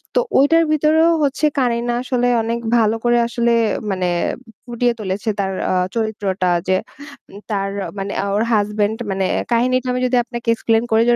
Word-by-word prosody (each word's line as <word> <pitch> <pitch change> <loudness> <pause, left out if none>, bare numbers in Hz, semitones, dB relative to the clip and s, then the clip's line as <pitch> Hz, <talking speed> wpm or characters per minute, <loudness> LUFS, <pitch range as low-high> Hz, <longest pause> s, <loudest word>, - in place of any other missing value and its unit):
তো - - +4 0.2
ওইটার 330 +4 +4
ভিতরেও 310 +2 +3
হচ্ছে 285 +2 0
কারিনা 240 -1 0
আসলে 250 -1 0 0.2
অনেক 230 +1 -2 0.2
ভালো 225 -1 +2
করে 240 0 +3
আসলে 235 0 0 0.4
মানে 185 -1 -1 0.6
ফুটিয়ে 240 0 0
তুলেছে 200 +2 -3
তার 195 -1 0 0.2
আ - - +1 0.2
চরিত্রটা 200 -5 -1 0.2
যে, 185 - +3 0.5
উম 200 - -11
তার 195 -1 -1 0.3
মানে 200 +1 -4 0.2
ওর 215 - +2
husband 210 +1 0
মানে 190 0 -1 0.3
কাহিনীটা 255 +2 +1
আমি 250 - -2
যদি 250 0 +1
আপনাকে 240 -1 -5
explain 225 0 +1
করি 220 +1 +4
যে, 240 - +5
230 Hz, 160 wpm, -19 LUFS, 205-250 Hz, 0.6 s, যে